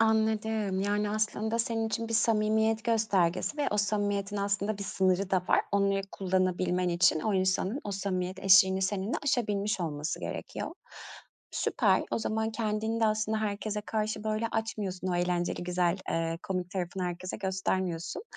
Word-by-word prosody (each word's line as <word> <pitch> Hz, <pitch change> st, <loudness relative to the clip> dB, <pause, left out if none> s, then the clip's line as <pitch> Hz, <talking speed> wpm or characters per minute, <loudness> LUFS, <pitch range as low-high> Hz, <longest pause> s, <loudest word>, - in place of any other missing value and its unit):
Anladım, 220 Hz, -3 st, +1 dB
yani 205 Hz, +1 st, 0 dB
aslında 215 Hz, +1 st, -1 dB
senin 225 Hz, -1 st, 0 dB
için 230 Hz, +1 st, -2 dB
bir 230 Hz, -, -2 dB
samimiyet 220 Hz, 0 st, +2 dB
göstergesi 215 Hz, -, +1 dB
ve 290 Hz, -2 st, +1 dB
o 210 Hz, -, 0 dB
samimiyetin 205 Hz, -1 st, 0 dB
aslında 200 Hz, +1 st, -1 dB
bir -, -, -4 dB
sınırı 190 Hz, -1 st, +1 dB
da 185 Hz, -2 st, +2 dB
var. -, -, +5 dB
Onları 200 Hz, -1 st, +2 dB
kullanabilmen 185 Hz, -1 st, +1 dB
için 170 Hz, -2 st, +3 dB
o 210 Hz, +5 st, 0 dB
insanın 190 Hz, +6 st, +1 dB
o 205 Hz, -, -3 dB
samimiyet 185 Hz, -1 st, -2 dB
eşiğini 190 Hz, 0 st, +6 dB
seninle 195 Hz, +3 st, -1 dB
aşabilmiş 210 Hz, -7 st, 0 dB
olması 150 Hz, -2 st, -3 dB
gerekiyor. -, -, -5 dB, 0.8 s
Süper, -, -, +2 dB
o -, -, 0 dB
zaman 220 Hz, 0 st, -1 dB
kendini 220 Hz, 0 st, -1 dB
de 225 Hz, -, +4 dB
aslında 215 Hz, 0 st, 0 dB
herkese 210 Hz, 0 st, -2 dB
karşı 215 Hz, 0 st, -2 dB
böyle 215 Hz, +1 st, 0 dB
açmıyorsun; 200 Hz, -4 st, -2 dB
o 180 Hz, -, 0 dB
eğlenceli, 175 Hz, 0 st, 0 dB
güzel, 180 Hz, 0 st, +1 dB, 0.2 s
ııı, 165 Hz, 0 st, -1 dB
komik 180 Hz, -2 st, -3 dB
tarafını 185 Hz, -1 st, -3 dB
herkese 180 Hz, +1 st, -4 dB
göstermiyorsun. 190 Hz, -, -2 dB
200 Hz, 150 wpm, -29 LUFS, 185-220 Hz, 0.8 s, eşiğini